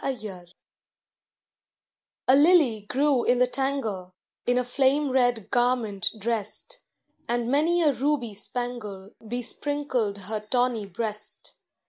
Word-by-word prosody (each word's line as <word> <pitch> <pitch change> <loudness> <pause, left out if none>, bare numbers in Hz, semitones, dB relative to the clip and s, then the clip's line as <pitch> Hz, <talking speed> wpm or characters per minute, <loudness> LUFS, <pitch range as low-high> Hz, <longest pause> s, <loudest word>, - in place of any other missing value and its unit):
KINSHIP 205 -9 -5 1.8
A 260 - +7
lily 285 - +4
grew 275 -2 +2
in 245 - +3
the 250 - +5
tangle, 240 -9 -2 0.3
In 245 0 +3
a 250 - +2
flame 270 +3 +2
red 245 -5 +1
garment 240 -6 +1
dressed, 215 -1 -3 0.5
And 240 0 -1
many 330 +5 +3
a 295 -3 +4
ruby 265 -4 0
spangle 210 -3 -5
Besprinkled 245 -1 -2
her 215 +3 -3
tawny 230 0 0
breast. 210 +2 -5
245 Hz, 110 wpm, -26 LUFS, 215-270 Hz, 1.8 s, A